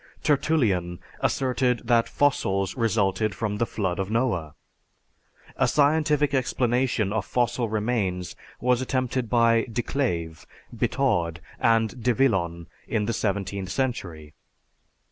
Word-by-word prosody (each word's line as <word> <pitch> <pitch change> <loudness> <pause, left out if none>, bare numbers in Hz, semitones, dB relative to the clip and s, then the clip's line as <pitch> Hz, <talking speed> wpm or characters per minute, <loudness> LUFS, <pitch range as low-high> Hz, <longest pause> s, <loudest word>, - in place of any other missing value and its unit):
Tertullian 110 - +1 0.2
asserted 125 -2 0
that 115 -1 +3
fossils 100 -9 +1
resulted 110 -3 +1
from 105 -2 -2
the 115 - +1
flood 95 -3 -2
of 95 0 -2
Noah. 105 - -1 1.0
A - - +3
scientific 150 0 +2
explanation 125 -4 +1
of 110 -3 0
fossil 120 0 0
remains 105 -5 -1 0.2
was 125 0 +2
attempted 130 -2 -1
by 115 -1 +3
De 120 +1 -1
Clave, 85 - -2 0.3
Bitaud, 85 -1 0 0.2
and 115 0 +2
De 125 0 +2
Villon 85 -10 +1 0.2
in 105 -2 0
the 115 - -1
seventeenth 100 -2 -2
century. 90 - -3
115 Hz, 115 wpm, -25 LUFS, 95-125 Hz, 1.0 s, that